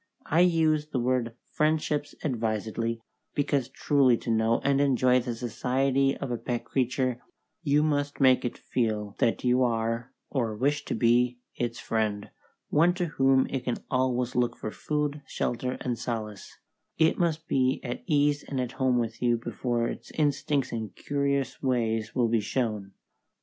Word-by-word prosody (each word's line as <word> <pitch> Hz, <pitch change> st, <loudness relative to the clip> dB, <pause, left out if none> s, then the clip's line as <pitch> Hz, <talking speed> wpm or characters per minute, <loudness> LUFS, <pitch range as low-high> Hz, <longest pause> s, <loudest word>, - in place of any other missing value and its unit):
I 160 Hz, -, +2 dB
use 160 Hz, -4 st, +3 dB
the 145 Hz, -4 st, -2 dB
word 120 Hz, -1 st, 0 dB, 0.2 s
friendships 150 Hz, -1 st, 0 dB
advisedly, 115 Hz, -2 st, -2 dB, 0.3 s
because 140 Hz, -3 st, 0 dB
truly 135 Hz, -3 st, +3 dB
to 115 Hz, -, -3 dB
know 110 Hz, +1 st, +2 dB
and 140 Hz, 0 st, +3 dB
enjoy 130 Hz, -2 st, +4 dB
the 120 Hz, -1 st, -3 dB
society 130 Hz, +3 st, +1 dB
of 135 Hz, -, -4 dB
a 120 Hz, -, -2 dB
pet 120 Hz, -2 st, -3 dB
creature 130 Hz, -1 st, 0 dB, 0.4 s
you 150 Hz, -2 st, +3 dB
must 145 Hz, -2 st, 0 dB
make 130 Hz, -2 st, +5 dB
it 120 Hz, -, -3 dB
feel 105 Hz, -4 st, -2 dB
that 115 Hz, -, +1 dB
you 125 Hz, 0 st, +3 dB
are, 115 Hz, +1 st, 0 dB, 0.2 s
or 115 Hz, -6 st, -1 dB
wish 145 Hz, +6 st, 0 dB
to -, -, -2 dB
be, 120 Hz, +2 st, +3 dB, 0.2 s
its 120 Hz, -1 st, -2 dB
friend, 105 Hz, -2 st, -2 dB, 0.4 s
one 170 Hz, +4 st, +4 dB
to 180 Hz, -1 st, 0 dB
whom 135 Hz, -4 st, +3 dB
it 135 Hz, -, -3 dB
can 125 Hz, -, -1 dB
always 125 Hz, -1 st, 0 dB
look 120 Hz, -1 st, +1 dB
for 110 Hz, -, -5 dB
food, 150 Hz, +2 st, -2 dB
shelter, 125 Hz, +1 st, -2 dB
and 120 Hz, -3 st, -2 dB
solace; 110 Hz, -4 st, -5 dB, 0.4 s
it 160 Hz, 0 st, +3 dB
must 165 Hz, -2 st, 0 dB
be 130 Hz, 0 st, +2 dB
at 120 Hz, -2 st, -4 dB
ease 145 Hz, -2 st, +2 dB
and 135 Hz, -, -4 dB
at 125 Hz, -2 st, -2 dB
home 130 Hz, -2 st, +1 dB
with 115 Hz, -1 st, -2 dB
you 120 Hz, -1 st, +3 dB
before 120 Hz, 0 st, -2 dB
its -, -, -7 dB
instincts 145 Hz, -2 st, +1 dB
and 110 Hz, -4 st, -5 dB
curious 140 Hz, -2 st, -1 dB
ways 115 Hz, -4 st, 0 dB
will 120 Hz, -2 st, +3 dB
be 115 Hz, -1 st, +2 dB
shown. 105 Hz, -4 st, -2 dB
125 Hz, 160 wpm, -27 LUFS, 115-140 Hz, 0.4 s, make